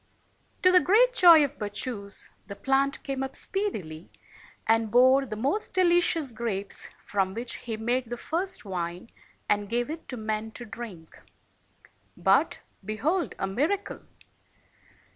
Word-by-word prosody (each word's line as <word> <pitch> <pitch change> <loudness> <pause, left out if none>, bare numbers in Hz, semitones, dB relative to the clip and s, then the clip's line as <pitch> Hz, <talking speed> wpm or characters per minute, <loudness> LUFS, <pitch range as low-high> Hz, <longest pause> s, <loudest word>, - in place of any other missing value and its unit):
To 365 - +7
the 365 - +7
great 470 +8 +4
joy 340 -8 +8
of 285 +1 -9
Bacchus, 205 0 -2 0.2
the 200 - -7
plant 275 +3 0
came 270 -1 -3
up 270 0 -2
speedily, 185 - -2 0.6
and 225 0 +2
bore 260 +4 +5
the 215 - -5
most 280 - -2
delicious 345 -5 +3
grapes, 215 -4 -3 0.2
from 195 -1 -1
which 235 +2 -5
he 225 -2 -3
made 240 +2 -1
the 240 - -4
first 345 - -3
wine 180 +1 -5 0.4
and 205 -1 0
gave 240 +5 -1
it 320 0 -8
to 255 - -5
men 220 0 -3
to 240 - -8
drink. 205 -8 -10 1.0
But - - +2
— - - -39
behold 295 - -1
a - - -1
miracle! 305 - -2
240 Hz, 145 wpm, -27 LUFS, 210-315 Hz, 1.0 s, joy